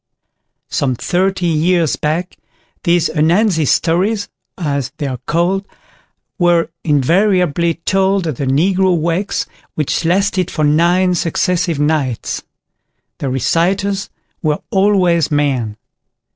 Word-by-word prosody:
Some 130 -3 0
thirty 185 +6 0
years 170 0 +2
back 165 +4 -2 0.5
these 170 -1 +3
"Ananzi 165 +2 +2
Stories", 195 - +1 0.3
as 140 -6 -2
they 145 - -3
are 130 -3 -4
called, 180 +4 0 0.7
were 175 -2 +2
invariably 170 +2 +2
told 195 -1 +1
at 155 -6 -3
the 140 - -2
Negro 180 +6 +2
wakes, 170 +5 -1 0.3
which 150 +2 -1
lasted 185 +1 +1
for 155 - -2
nine 175 +5 +3
successive 170 -1 0
nights. 145 -5 -1 0.8
The 140 - -2
reciters 185 - 0 0.3
were 150 -3 -1
always 190 -5 +3
men. 135 -8 0
170 Hz, 105 wpm, -16 LUFS, 150-185 Hz, 0.8 s, these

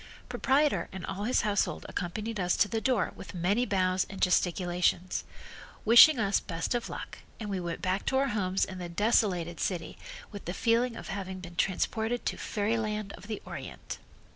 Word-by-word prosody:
Proprietor 285 +2 +2
and 190 -2 -6
all 195 +2 -4
his 250 - +2
household 205 -1 0
accompanied 210 +4 -4
us 180 -1 +1
to - - +4
the 220 +2 -2
door 250 -6 +1
with - - -10
many 200 +8 +1
bows 185 -1 +1
and 195 - -8
gesticulations, 180 0 +1 0.6
wishing 240 +7 +9
us 200 -3 +2
best 165 +6 -3
of 240 -1 -2
luck, - - -7 0.2
and 210 -2 -4
we 195 - -1
went 170 -1 -4
back 185 +1 -1
to 265 - +2
our 275 0 +2
homes 190 -4 +1
in 185 -1 -8
the 175 -1 -5
desolated 180 -3 +1
city 175 -4 -3 0.3
with 205 - -8
the 175 - -4
feeling 235 0 +2
of - - -8
having 190 -1 -4
been 175 -1 -10
transported 220 +6 0
to - - 0
Fairyland 215 -1 -2
of 205 - -11
the 215 -2 -5
Orient. - - -7
200 Hz, 180 wpm, -30 LUFS, 180-225 Hz, 0.6 s, wishing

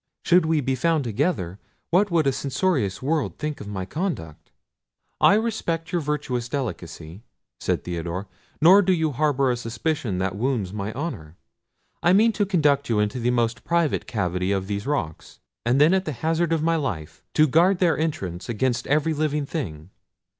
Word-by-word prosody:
Should 175 -2 +4
we 160 -2 +2
be 135 0 0
found 155 +3 +1
together, 110 - -1 0.3
what 195 +4 +3
would 165 -4 +2
a 135 - +3
censorious 135 - -1
world 150 +1 -1
think 150 -1 -4
of 105 - -8
my 95 -2 -4
conduct?" 150 - -5 0.7
"I 200 - +6
respect 210 -7 -1
your 175 - 0
virtuous 140 -5 -2
delicacy," 90 - -5 0.4
said - - -1
Theodore; 85 +2 -4 0.3
"nor 185 +6 +7
do 190 -1 +2
you 160 -3 +1
harbour 140 -1 +1
a - - 0
suspicion 120 - -2
that 95 0 -1
wounds 110 -4 -1
my 105 0 -3
honour. 90 - -6 0.6
I 175 - +4
meant 220 +3 +5
to 205 -2 +1
conduct 145 -7 +2
you 115 - +2
into 105 +4 0
the 120 +1 +1
most 120 0 0
private 170 -3 0
cavity 90 -3 -1
of 95 -1 0
these 100 +4 -4
rocks, 95 - -3 0.3
and 125 +3 +3
then 155 +5 +6
at 190 0 +1
the 155 - -3
hazard 165 +4 0
of 160 -2 +1
my 165 0 +2
life 90 - -4
to 155 - +6
guard 170 +6 +4
their 175 -3 +3
entrance 95 - -3
against 120 +1 -1
every 155 +3 +2
living 150 -1 -1
thing. 90 - -5
140 Hz, 175 wpm, -24 LUFS, 105-165 Hz, 0.7 s, nor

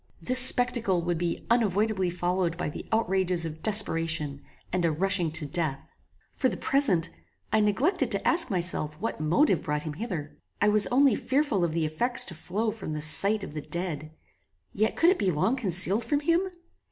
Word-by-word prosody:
This 255 0 +2
spectacle 245 -8 +2
would 175 -1 -2
be 170 -1 -3
unavoidably 210 -4 +1
followed 175 -1 -2
by 175 -4 -4
the - - -9
outrages 190 -5 +1
of 160 0 -8
desperation, 165 -9 +1 0.3
and 180 -1 0
a 165 - +1
rushing 180 +1 0
to 160 -1 +7
death. 155 -3 -1 0.5
For 260 - 0
the - - -5
present, 195 - +1 0.4
I 220 - +4
neglected 215 - 0
to - - 0
ask 335 -4 +2
myself 170 -5 -1
what 225 -6 -4
motive 175 - +2
brought 150 0 -3
him 155 - -6
hither. 165 -5 -6 0.3
I 205 - +2
was 210 0 +6
only 265 0 +3
fearful 265 -6 -1
of 165 -2 -1
the 165 -1 -1
effects 240 +12 +2
to 175 - -7
flow 200 +7 -3
from 215 -8 -7
the 150 - -5
sight 200 +7 +3
of 150 - -8
the 150 - -5
dead. 155 -3 -4 0.6
Yet 215 +2 -1
could 340 +2 +4
it 380 - -1
be 195 - 0
long 180 - 0
concealed 195 -2 0
from 290 -1 -1
him? 335 +5 +1
185 Hz, 185 wpm, -26 LUFS, 165-225 Hz, 0.6 s, to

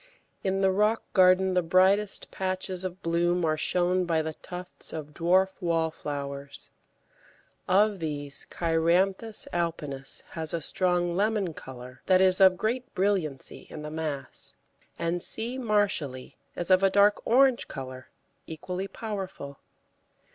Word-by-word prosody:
In 195 0 0
the 190 -1 +4
rock 210 +4 +2
garden 185 0 +5
the 180 - +3
brightest 190 +4 +2
patches 185 -1 -3
of 185 +1 -6
bloom 175 +1 +1
are 155 -1 +2
shown 180 +3 +1
by 165 -2 +1
the 160 0 -4
tufts 180 +2 -7
of 150 -2 -6
dwarf 185 +5 +2
Wallflowers; 145 -4 -3 1.0
of 205 +1 +3
these, 145 -3 -2
Cheiranthus 180 +6 +1
alpinus 150 -6 -3
has 160 0 -2
a - - -1
strong 175 +1 0
lemon 205 -3 0
colour 125 -2 -10
that 185 -1 +5
is 185 0 +4
of 190 -1 +7
great 240 +6 -2
brilliancy 185 -8 -1
in 150 - -8
the 150 - -6
mass, 150 -4 -3 0.4
and 170 +1 -1
C. 240 +8 -3
Marshalli 200 - -1 0.2
is 175 +1 -2
of 185 0 +6
a 195 - +5
dark 205 +1 +4
orange 260 +1 +3
colour, 130 -1 -8 0.4
equally 180 +4 -5
powerful. 190 -9 -6
180 Hz, 135 wpm, -27 LUFS, 160-195 Hz, 1.0 s, of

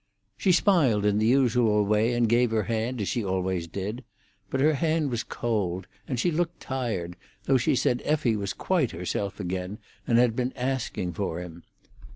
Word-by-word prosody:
She 190 - +2
smiled 150 - +3
in 105 0 +3
the 110 - +2
usual 120 -5 +3
way, 105 +3 +2
and 120 -1 +2
gave 120 +2 +3
her 110 -1 +1
hand, 115 +3 -2
as 100 - -2
she 120 - -1
always 95 -2 -1
did; 100 +8 -5 0.5
but 135 - -2
her 155 +3 +4
hand 155 -1 0
was 120 -1 -1
cold, 100 -6 -2 0.2
and 125 -4 -2
she 175 - +2
looked 170 +1 -1
tired, 110 -10 -3 0.3
though 135 - +3
she 130 - +2
said 125 0 +1
Effie 145 -7 +1
was 100 -2 -3
quite 165 - 0
herself 95 +4 -3
again, 90 +1 -3 0.3
and 120 -3 +3
had 120 -2 +4
been 125 +1 -1
asking 125 -8 -2
for 85 -2 -3
him. 85 -1 -9
115 Hz, 185 wpm, -26 LUFS, 100-130 Hz, 0.5 s, her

